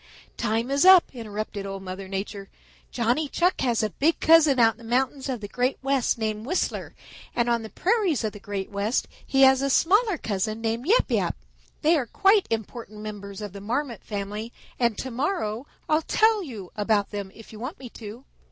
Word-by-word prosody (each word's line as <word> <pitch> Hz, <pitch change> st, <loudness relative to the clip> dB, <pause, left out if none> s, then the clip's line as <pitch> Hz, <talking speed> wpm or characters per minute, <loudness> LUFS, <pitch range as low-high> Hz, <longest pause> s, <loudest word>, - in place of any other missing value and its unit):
"Time 230 Hz, +2 st, -1 dB
is 280 Hz, +1 st, +3 dB
up," 375 Hz, -1 st, +7 dB
interrupted 215 Hz, -3 st, -5 dB
Old 195 Hz, -1 st, -6 dB
Mother 190 Hz, +1 st, -6 dB
Nature. 195 Hz, +1 st, -5 dB, 0.4 s
"Johnny 245 Hz, +6 st, 0 dB
Chuck 355 Hz, +5 st, +1 dB
has 235 Hz, -4 st, +1 dB
a 215 Hz, -, -1 dB
big 310 Hz, -, +1 dB
cousin 315 Hz, -4 st, +6 dB
out 225 Hz, -2 st, +5 dB
in -, -, -28 dB
the -, -, -13 dB
mountains 265 Hz, +4 st, -1 dB
of 250 Hz, -4 st, -3 dB
the 205 Hz, -, -5 dB
Great 250 Hz, +5 st, 0 dB
West 270 Hz, -3 st, +1 dB
named 215 Hz, -1 st, -2 dB
Whistler, 365 Hz, -, -2 dB, 0.4 s
and 240 Hz, 0 st, +1 dB
on 235 Hz, -1 st, +1 dB
the 220 Hz, -, -8 dB
prairies 370 Hz, -, +1 dB
of 215 Hz, -, -2 dB
the 205 Hz, -, -10 dB
Great 200 Hz, -1 st, -5 dB
West 205 Hz, +4 st, -1 dB, 0.2 s
he 270 Hz, 0 st, +3 dB
has 265 Hz, 0 st, +6 dB
a 275 Hz, -, 0 dB
smaller 400 Hz, -, +3 dB
cousin 215 Hz, -2 st, -2 dB
named 230 Hz, +4 st, -2 dB
Yap 450 Hz, +6 st, +3 dB
Yap. -, -, +1 dB, 0.5 s
They 320 Hz, +3 st, +5 dB
are 255 Hz, -5 st, -2 dB
quite 395 Hz, -, +3 dB
important 220 Hz, -1 st, -5 dB
members 205 Hz, -1 st, -7 dB
of 205 Hz, -3 st, -6 dB
the 200 Hz, -, -8 dB
Marmot 240 Hz, +2 st, -3 dB
family, 210 Hz, +2 st, -5 dB, 0.3 s
and 235 Hz, -4 st, +1 dB
to 260 Hz, -, -4 dB
morrow 255 Hz, -, -2 dB, 0.2 s
I'll 310 Hz, +1 st, +3 dB
tell 435 Hz, +5 st, +3 dB
you 220 Hz, -, -8 dB
about 210 Hz, -1 st, +1 dB
them 200 Hz, -2 st, -5 dB
if 225 Hz, 0 st, -13 dB
you 215 Hz, -, -10 dB
want 260 Hz, -, -5 dB
me 260 Hz, -, -9 dB
to. 225 Hz, +4 st, -10 dB
235 Hz, 200 wpm, -25 LUFS, 210-275 Hz, 0.5 s, up